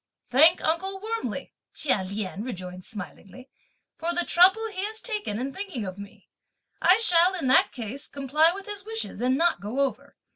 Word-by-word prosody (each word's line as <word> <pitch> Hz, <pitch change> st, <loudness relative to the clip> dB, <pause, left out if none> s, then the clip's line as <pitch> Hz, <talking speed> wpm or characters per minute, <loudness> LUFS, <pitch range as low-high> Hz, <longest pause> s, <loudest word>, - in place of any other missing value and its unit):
"Thank 320 Hz, +7 st, +6 dB
uncle 380 Hz, +4 st, 0 dB
warmly," 450 Hz, +3 st, -4 dB, 0.2 s
Chia 260 Hz, -10 st, +1 dB
Lien 200 Hz, +1 st, -5 dB
rejoined 185 Hz, -6 st, -7 dB
smilingly, 220 Hz, +6 st, -10 dB, 0.5 s
"for 335 Hz, +1 st, -1 dB
the 350 Hz, -, +1 dB
trouble 380 Hz, +6 st, +5 dB
he 380 Hz, -2 st, -4 dB
has 440 Hz, +1 st, -5 dB
taken 420 Hz, -, -3 dB
in 265 Hz, +3 st, -4 dB
thinking 380 Hz, -, -5 dB
of 185 Hz, +1 st, -7 dB
me; 200 Hz, 0 st, -12 dB, 0.5 s
I 365 Hz, +2 st, +6 dB
shall, 360 Hz, -4 st, +4 dB
in 345 Hz, -, -4 dB
that 260 Hz, -, +4 dB
case, 250 Hz, +3 st, -7 dB
comply 285 Hz, +4 st, +2 dB
with 390 Hz, +2 st, -8 dB
his 415 Hz, -1 st, -6 dB
wishes 445 Hz, -, -4 dB
and 255 Hz, +2 st, +2 dB
not 340 Hz, +2 st, +1 dB
go 220 Hz, +7 st, -2 dB
over. 275 Hz, -2 st, -3 dB
310 Hz, 175 wpm, -26 LUFS, 230-385 Hz, 0.5 s, Thank